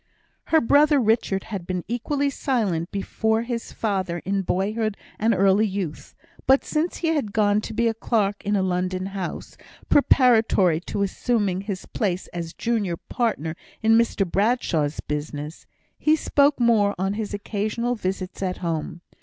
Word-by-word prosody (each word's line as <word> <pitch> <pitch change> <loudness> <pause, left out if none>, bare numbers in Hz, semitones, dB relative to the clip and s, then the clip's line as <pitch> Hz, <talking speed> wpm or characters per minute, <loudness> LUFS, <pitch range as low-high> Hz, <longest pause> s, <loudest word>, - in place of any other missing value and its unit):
Her 320 - +4
brother 290 +3 +4
Richard 220 -4 +1
had 190 -5 -6
been 180 -2 -2
equally 280 +5 -1
silent 205 - -1
before 220 +3 -1
his 235 -1 -4
father 190 -5 -2
in 195 +1 0
boyhood 210 +3 -1 0.2
and 225 +2 +3
early 195 +1 +4
youth; 190 -6 -5 0.3
but 265 +1 +5
since 320 +3 -1
he - - +2
had 285 -11 -1
gone 210 -1 +3
to - - -6
be 230 +1 +1
clerk 210 -3 0
in 205 0 0
a 195 - +2
London 185 0 -1
house, 190 -3 -5 0.3
preparatory 225 - +4
to 200 - -1
assuming 200 -2 0
his 195 -2 -5
place 185 -4 -2
as 170 -1 -6
junior 210 -7 -1
partner 170 - -2 0.3
in 225 0 +5
Mr 230 -3 +2
Bradshaw's 175 - 0
business, 150 +1 -5 0.3
he 310 0 +4
spoke 285 -2 +2
more 220 -4 +3
on 195 +2 -1
his 210 -1 -3
occasional 215 +4 -2
visits 185 -4 -4
at 185 -1 -2
home. 165 +1 -3
205 Hz, 150 wpm, -24 LUFS, 185-230 Hz, 0.3 s, but